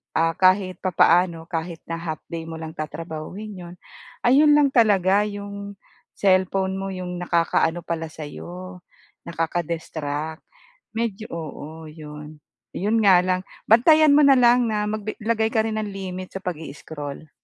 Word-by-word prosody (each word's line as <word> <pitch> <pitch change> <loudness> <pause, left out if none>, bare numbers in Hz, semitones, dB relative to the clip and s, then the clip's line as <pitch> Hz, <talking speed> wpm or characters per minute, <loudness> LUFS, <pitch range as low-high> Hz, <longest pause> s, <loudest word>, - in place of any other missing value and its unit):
ah, 165 +1 +2
kahit 185 -1 +3
papaano 170 -2 +3
kahit 165 -1 -4
na 165 - -2
half 160 -2 -5
day 165 -1 -4
mo 165 - -6
lang 160 0 -7
tatrabahuhin 165 +6 -6
'yon. 175 +1 -10 0.5
Ayun 290 +5 +6
lang 290 -1 +4
talaga, 205 -3 +4
'yong 200 -1 -6 0.4
cellphone 190 0 +2
mo 195 0 -4
'yong 180 -1 -5
nakakaano 170 -1 +1
pala 165 -1 -3
sa 155 - -10
'yo, 180 +4 -9 0.5
nakaka-distract. 160 -2 -3 0.5
Medyo, 225 -2 -2
oo, 160 0 -7
'yun. 150 0 -10 0.4
'Yon 215 +4 +1
nga 190 -3 +7
lang, 185 0 0 0.3
bantayan 305 +7 +6
mo 300 - +6
na 280 - +7
lang 245 0 +5
na 210 -1 -1
mag-bi, 215 0 -3
maglagay 220 0 +1
ka 225 - +1
rin 220 - -3
ng 210 -1 -3
limit 185 -1 -6
sa 190 - -4
pag-i-scroll. 150 -2 -7
185 Hz, 145 wpm, -23 LUFS, 165-210 Hz, 0.5 s, nga